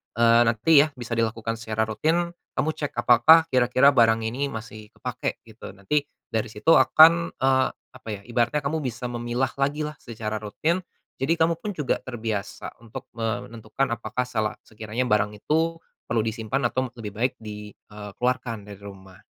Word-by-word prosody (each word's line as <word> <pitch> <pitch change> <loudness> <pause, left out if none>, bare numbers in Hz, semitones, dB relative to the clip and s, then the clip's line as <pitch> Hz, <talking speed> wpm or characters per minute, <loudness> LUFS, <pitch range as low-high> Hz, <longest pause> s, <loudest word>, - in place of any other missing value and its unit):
eee, 115 0 +5
nanti 115 +7 +1
ya - - -4
bisa 120 -2 -9
di 115 - +3
lakukan 115 0 -4
secara 110 -1 -1
rutin. 165 +9 0 0.2
Kamu 155 - 0
cek, 145 -2 -5
apakah 155 +8 +6
kira-kira 130 +2 +4
barang 115 -4 +4
ini 125 +6 -2
masih 110 -3 -8
kepakai? - - -4
Gitu. 110 0 -12
Nanti 100 +10 0 0.3
dari 110 0 -1
situ 110 +8 0
akan, 170 +2 +6
eee, 130 0 +3 0.2
apa 130 -2 -16
ya, 100 - -7
ibaratnya 120 +5 0
kamu 155 +3 -1
bisa 125 -4 -5
memilah 120 +2 -2
lagilah 150 +2 -1
secara 110 -2 -5
rutin. 155 - -1 0.4
Jadi, 145 +5 +1
kamu 165 0 +1
pun 210 - -4
juga 150 -5 -1
terbiasa 110 -5 -5
untuk 115 -2 -9
menentukan, 115 +2 -3
apakah 115 +2 -2
sela 110 -4 -2
sekiranya 110 +3 -4
barang 105 -3 +1
itu 160 +9 0 0.3
perlu 115 -1 +1
disimpan 115 +4 -2
atau 130 0 -1
lebih 105 -3 -6
baik 120 +4 0
di, 105 -1 -8
eee, 105 -1 -11
keluarkan 125 -3 -1
dari 100 -1 -11
rumah? 95 -2 -12
120 Hz, 165 wpm, -25 LUFS, 110-135 Hz, 0.4 s, apakah